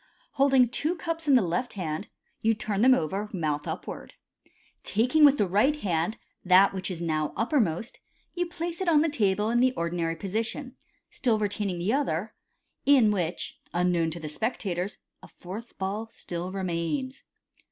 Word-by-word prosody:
Holding 270 -3 +4
two 305 +8 -1
cups 330 -1 -4
in 280 - +6
the 245 - +5
left 180 +8 -2
hand, 165 -1 -4 0.3
you 225 0 +3
turn 210 -1 -2
them 255 +2 +7
over, 195 +5 -2
mouth 150 -5 -2
upwards. - - -6 0.7
Taking 250 +9 +2
with 290 -1 +7
the 205 - +3
right 210 +11 +3
hand 185 - -1 0.3
that 190 +2 +6
which 190 0 -3
is 170 -2 -4
now 155 -2 -1
uppermost, 225 - 0 0.3
you 355 -1 -1
place 345 0 -5
it 370 - +1
on 305 -3 +5
the 325 - +2
table 210 -5 +1
in 240 - +3
the 255 +1 +4
ordinary 170 -2 -1
position, 225 - -3 0.4
still 235 -4 +1
retaining 205 -3 -2
the 185 +7 0
other, 220 - -1 0.5
in 260 -7 +5
which, 175 -4 -3 0.2
unknown 175 -2 +2
to 165 +2 -6
the 155 - -6
spectators, 190 - -2 0.2
a - - -12
fourth 205 +7 -9
ball 205 +4 -3
still 175 -4 -6
remains. 190 - -2
210 Hz, 165 wpm, -27 LUFS, 175-260 Hz, 0.7 s, them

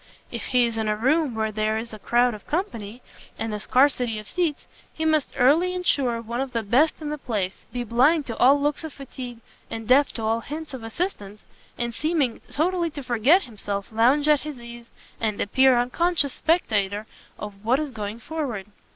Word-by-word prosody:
If - - -5
he 250 -2 +3
is 230 -1 -3
in 220 - -1
a 210 - +1
room 270 +3 +1
where 220 -1 -1
there 215 +1 0
is 225 0 -6
a 215 - -8
crowd 240 +3 +2
of 210 - -11
company, 245 - -3 0.3
and 225 0 -3
a 210 - -3
scarcity 250 -1 +2
of 215 0 -8
seats, 340 -5 -1 0.3
he 320 - -4
must 310 -3 +1
early 320 +8 +4
ensure 270 -10 +1
one 235 +3 -3
of 270 -2 -4
the 230 -1 -1
best 260 +10 +3
in 295 - -3
the 300 - -4
place, 205 -7 -3
be 245 +1 -3
blind 270 +7 +3
to 230 - -5
all 275 +3 +6
looks 295 +2 -1
of 320 - -6
fatigue, 255 -3 -8 0.3
and 225 -1 -6
deaf 275 +2 +5
to 225 - -4
all 225 +1 +1
hints 305 +3 -7
of 260 - -6
assistance, 225 - -4 0.3
and 235 -1 -2
seeming 300 -3 0
totally 340 +2 +1
to 290 -2 -8
forget 255 - +4
himself, 205 -4 -5
lounge 255 +7 +3
at 300 -1 +5
his 300 -4 -7
ease, 235 0 -11 0.3
and 215 -2 -1
appear 260 +4 +4
an 240 - +4
unconscious 320 +2 +1
spectator 210 - 0 0.3
of 205 -1 -8
what 240 +4 +3
is 305 -3 -3
going 210 -2 -5
forward. 245 -6 -4
245 Hz, 200 wpm, -24 LUFS, 220-295 Hz, 0.3 s, all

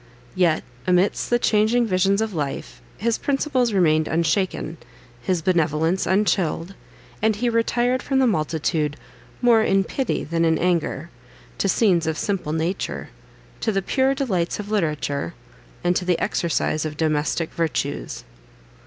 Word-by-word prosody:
Yet, 175 -4 +2 0.2
amidst 180 +2 +2
the 240 - +4
changing 230 +1 +2
visions 195 +1 +2
of 220 -2 -4
life, 135 - -4 0.2
his 230 +2 0
principles 270 -4 +1
remained 155 -5 +3
unshaken, 165 0 0 0.4
his 175 +4 -1
benevolence 165 +1 +1
unchilled; 190 -2 +1 0.5
and 220 0 +2
he 240 +3 0
retired 240 +2 +1
from 270 - -1
the 265 - +4
multitude 155 - 0 0.5
"more 235 -2 +6
in 195 -2 +3
pity 265 +4 -2
than 165 +2 -1
in 160 -1 +3
anger," 170 -2 -1 0.5
to 195 - +1
scenes 180 -7 +3
of 160 -1 -1
simple 195 -7 -2
nature, 160 +4 -2 0.5
to - - 0
the 195 -2 -1
pure 265 +5 +1
delights 195 - -1
of 210 0 -6
literature, 150 - -1 0.5
and 175 0 +2
to - - -2
the 180 -2 +2
exercise 165 -2 0
of 155 -1 -5
domestic 155 +1 0
virtues. 160 - -2
180 Hz, 140 wpm, -23 LUFS, 160-215 Hz, 0.5 s, more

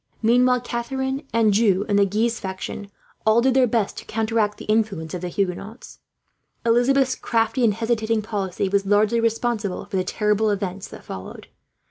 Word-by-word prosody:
Meanwhile 250 +2 +4
Catharine, 265 +4 -3
Anjou 210 -3 +3
and 205 -2 +2
the 200 - +4
Guise 225 +4 0
faction 190 +1 -6 0.3
all 220 +1 +4
did 260 +2 +3
their 260 -1 +4
best 220 -3 -1
to - - -12
counteract 220 -1 0
the - - -9
influence 210 -7 0
of 180 - -4
the 180 - -3
Huguenots. 200 +5 -4 0.7
Elizabeth's 255 +3 +3
crafty 230 +1 0
and 215 -4 +3
hesitating 225 -1 0
policy 200 -3 -2
was 200 0 0
largely 210 +3 +3
responsible 225 -3 -1
for 195 - -3
the 185 - +1
terrible 210 +3 +1
events 195 -1 -3
that - - -12
followed. 95 0 -9
220 Hz, 160 wpm, -23 LUFS, 200-235 Hz, 0.7 s, Meanwhile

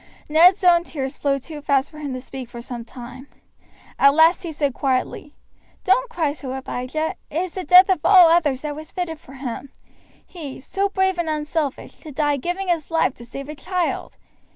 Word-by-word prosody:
Ned's 350 +6 +5
own 345 -1 +5
tears 270 -6 -5
flowed 275 -2 -1
too 305 -3 -8
fast 280 -1 +1
for 305 - -12
him 290 -2 -5
to 255 - -6
speak 260 -1 -8
for 240 - -9
some 235 0 -7
time. 250 +3 -11 0.7
At 280 +1 +6
last 325 +4 +5
he 340 -3 -5
said 290 -3 -1
quietly, 270 +3 -2 0.5
"Don't - - +2
cry 325 -11 -1
so, 270 -4 -7
Abijah. 265 +4 -3 0.2
It 300 - -5
is 370 - -6
the 370 - -5
death 360 +3 +8
of 370 -6 0
all 370 -4 +8
others 295 -6 +2
that 300 -1 -4
was 310 0 -9
fitted 330 -4 -4
for 265 - -15
him, 265 0 -6 0.6
he, 300 -7 -9
so 395 +8 -2
brave 380 -2 0
and 335 -2 -1
unselfish, 300 -2 -3
to 310 - -10
die 290 0 0
giving 355 +7 -3
his 335 -4 -1
life 325 -5 +1
to 235 - -11
save 275 +3 -8
a 300 - -6
child. 355 +4 -3
300 Hz, 200 wpm, -22 LUFS, 270-345 Hz, 0.7 s, death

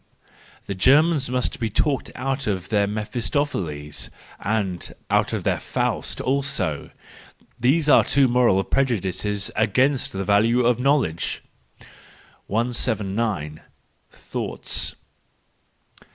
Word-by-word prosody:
—The 100 - -3
Germans 140 - +4
must 125 -1 -1
be 115 -2 -1
talked 135 +6 0
out 135 +1 -2
of 95 -3 -2
their 105 -2 +2
Mephistopheles—and 105 - -3 0.2
out - - +2
of - - -2
their - - 0
Faust - - -2
also. 135 - -1 0.7
These 145 +6 +2
are - - +7
two 140 -1 +3
moral 120 -6 +3
prejudices 105 -5 0
against 125 +6 +2
the 95 0 -3
value 115 +5 +3
of 120 -1 +3
knowledge. 130 - 0 1.0
179. 105 -7 -1 0.5
Thoughts. - - -3
115 Hz, 95 wpm, -23 LUFS, 100-130 Hz, 1.0 s, are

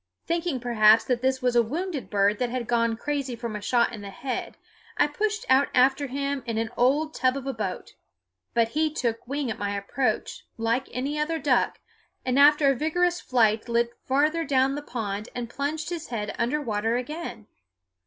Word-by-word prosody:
Thinking 335 -5 -1
perhaps 225 -2 +5
that 245 -2 -1
this 260 0 0
was 250 -1 +2
a 240 - +7
wounded 305 +5 -4
bird 205 0 +2
that 250 - 0
had 250 0 -3
gone 230 -1 +1
crazy 275 -1 -2
from 230 -2 -5
a 210 - -5
shot 240 +3 +2
in 215 - -7
the 200 - -7
head, 255 +6 -5 0.4
I - - +5
pushed 425 +9 -2
out 270 +2 +5
after 270 +3 +4
him 280 +1 -2
in 230 -1 -2
an 225 0 -1
old 290 +6 +2
tub 255 +1 +1
of 270 - -6
a 270 - -2
boat; - - -5 0.6
but 230 -1 +3
he 310 +4 0
took 235 -6 -2
wing 280 -2 -2
at - - -6
my 205 0 -2
approach, 220 +3 -2
like 230 +3 0
any 280 +4 -2
other 325 +2 0
duck, 270 -5 +1 0.5
and 255 +1 +2
after 290 0 +6
a - - 0
vigorous 350 +5 +1
flight 225 -2 +2
lit 235 0 +1
farther 300 +5 +2
down 270 -2 +2
the 290 - -4
pond 215 -6 -4
and 240 -1 -4
plunged 300 +5 -3
his 335 -2 -4
head 210 -4 -3
under 245 +6 +1
water 225 -3 -1
again. 255 -3 -6
255 Hz, 195 wpm, -26 LUFS, 230-290 Hz, 0.6 s, a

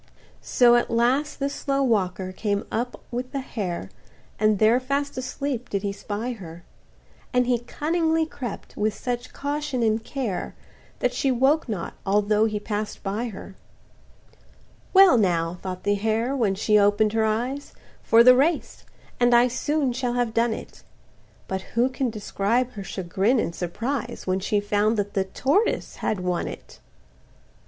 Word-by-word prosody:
So 240 -1 +4
at 240 - 0
last 255 +6 +1
this 280 0 -1
slow 275 -1 0
walker 190 -6 0
came 200 +1 -2
up 240 +3 -3
with 250 +1 -4
the 275 - -2
hare, 180 - -4 0.5
And 215 -1 +3
there 220 +4 +4
fast 280 +2 -2
asleep 255 -1 -4
did 200 -1 -2
he 200 - -1
spy 210 +4 -4
her; 175 -7 -9 0.7
And 250 0 +3
he 245 -1 +2
cunningly 320 +6 0
crept 255 -8 -7
with 215 0 0
such 245 0 -4
caution 285 -3 -2
and 220 0 +1
care, 240 -7 -4 0.5
That - - +1
she 275 - 0
woke 265 +3 +2
not, 195 -6 -4
although 210 +2 +2
he 215 -1 -1
pass'd 210 0 -4
by 205 +4 -2
her. 200 -3 -8 1.4
"Well 380 -9 +7
now," 175 -3 0
thought 185 -1 -5
the 205 - +2
hare, 220 +5 0
when 215 -7 +1
she 210 +1 +3
open'd 205 +1 +3
her 225 -1 +2
eyes, 245 +6 -1 0.3
"For 230 +1 +6
the 250 +1 +8
race,—and 255 -4 0
I 240 +1 +6
soon 280 +1 0
shall 245 0 -1
have 245 -2 0
done 230 0 +2
it;" - - -11 0.7
But 190 0 -3 0.2
who 245 +2 +4
can 260 -1 -1
describe 225 +3 -1
her 205 -5 -7
chagrin 195 +6 0
and 170 - -1
surprise, 230 +10 -3
When 185 0 0
she 205 +2 0
found 210 +2 +1
that 205 0 -2
the 190 -1 +1
tortoise 285 - 0
had 210 -4 -1
won 180 -1 -1
it! - - -10
230 Hz, 160 wpm, -24 LUFS, 205-255 Hz, 1.4 s, the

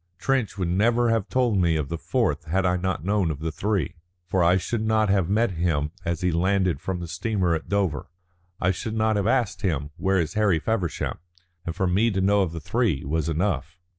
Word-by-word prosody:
Trench 125 0 0
would 90 -3 -1
never 115 +6 +2
have 115 -4 0
told 120 -6 +2
me 85 -3 +3
of 75 -3 -2
the 85 - -3
fourth - - 0
had 95 +4 0
I 90 0 +2
not 90 -3 -2
known 100 -3 +1
of 75 - -2
the 80 +2 -3
three. 95 -2 -1 0.3
For 90 0 +1
I 85 +2 +5
should 110 +5 -2
not 110 -1 +2
have 95 -3 +2
met 110 +2 +2
him 80 -4 0
as 85 -2 -2
he 90 0 +1
landed 90 -2 +1
from 95 -2 -3
the 85 - -5
steamer 90 0 0
at 80 - -4
Dover. 95 -9 -1 0.5
I 95 - +2
should 110 +4 -4
not 110 0 +2
have 100 0 0
asked 120 -3 +1
him, 75 -6 -1
'Where 95 +3 +1
is 80 - -1
Harry 105 -5 +3
Feversham?' 90 -1 -2 0.5
And 85 - -3
for 95 - 0
me 100 +6 +3
to 100 -3 -1
know 100 +1 +3
of 90 -4 0
the 85 - -5
three 100 - 0
was 80 +2 -1
enough." 90 +3 -1
95 Hz, 220 wpm, -25 LUFS, 85-105 Hz, 0.5 s, I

